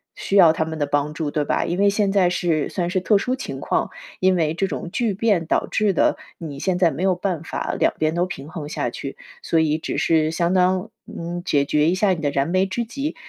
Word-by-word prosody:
需 195 - -3
要 175 -5 +8
他 160 - -1
们 160 0 -5
的 145 - +1
帮 145 +1 -1
助， 155 -2 -3
对 150 - 0
吧？ - - 0
因 175 +3 -2
为 200 - +5
现 200 -1 +1
在 190 -3 +3
是 170 -4 0
算 175 -2 -2
是 185 +1 0
特 205 +3 +3
殊 250 +6 -1
情 265 - -6
况， - - 0 0.3
因 185 0 +3
为 160 -3 +1
这 195 +4 -1
种 175 - -5
巨 230 -1 0
变 200 -4 +1
导 - - +1
致 210 -3 +1
的， - - +2 0.2
你 145 -4 -7
现 185 +3 0
在 175 -2 +3
没 145 +4 -6
有 190 -1 +3
办 180 -3 -2
法 - - -3
两 - - +3
边 155 0 +1
都 175 +1 +2
平 155 -5 -8
衡 155 -3 -6
下 - - -2
去， - - -7 0.3
所 165 - 0
以 155 -1 +2
只 - - -4
是 155 -1 +2
相 170 +1 0
当， 185 +3 +2 0.2
嗯， 175 +1 -5
解 145 -6 +1
决 150 +2 +2
一 180 - +1
下 200 +2 +2
你 170 - -1
的 145 - +1
燃 140 0 0
眉 185 +2 +2
之 235 +5 -2
急。 275 +7 -4
175 Hz, 270 characters per minute, -22 LUFS, 155-190 Hz, 0.3 s, 要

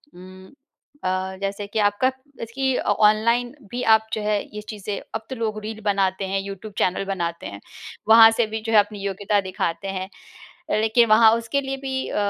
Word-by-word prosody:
उम, 185 +1 -13 0.6
अ, 185 +1 -2
जैसे 200 +1 -3
कि 220 +2 -3
आपका 255 +6 0 0.3
इसकी 260 +3 -1
अ, - - -1
ऑनलाइन 230 +4 +2 0.2
भी 245 +1 -3
आप 220 0 -2
जो 215 - -1
है 210 -1 0
ये 210 - -5
चीज़ें 205 -1 -5 0.2
अब 220 0 -4
तो 260 - -4
लोग 215 -2 -3
रील 220 0 -6
बनाते 195 -1 0
हैं 195 +1 -1
यूट्यूब 200 +1 -8
चैनल 185 +2 0
बनाते 170 -3 -3
हैं। 100 +1 -9 0.5
वहाँ 225 0 +9
से 225 0 +1
भी 220 0 -5
जो 225 0 -3
है 210 - +8
अपनी 205 0 -1
योग्यता 200 +1 0
दिखाते 185 0 -3
हैं। 190 0 -4 0.6
अ, - - +1
लेकिन 220 +2 +3
वहाँ 220 0 +7
उसके 230 +5 -2
लिए 270 0 -4
भी 265 -1 -3
अ, - - -5
210 Hz, 195 wpm, -23 LUFS, 195-225 Hz, 0.6 s, वहाँ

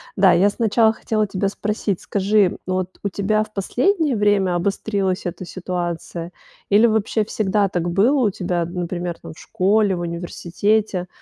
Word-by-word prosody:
Да, 190 -2 +5
я 185 +4 +4
сначала 220 +1 +2
хотела 215 -1 -1
тебя 195 0 -1
спросить, 205 -2 -2
скажи, 200 -1 +2
вот 185 0 -3
у 200 - 0
тебя 215 +3 0
в 215 - -13
последнее 295 - +1
время 205 -3 +2
обострилась 195 +1 -1
эта 175 +1 -4
ситуация 175 -1 -5 0.4
или 210 +3 +5
вообще 220 0 +1
всегда 205 -1 +1
так 175 -1 -2
было 225 +11 +3
у - - +2
тебя, 175 -2 -2
например, 175 0 -4
там - - -9
в - - -17
школе, 205 0 +1
в 175 - -4
университете, 180 +3 -1
195 Hz, 155 wpm, -21 LUFS, 180-215 Hz, 0.4 s, Да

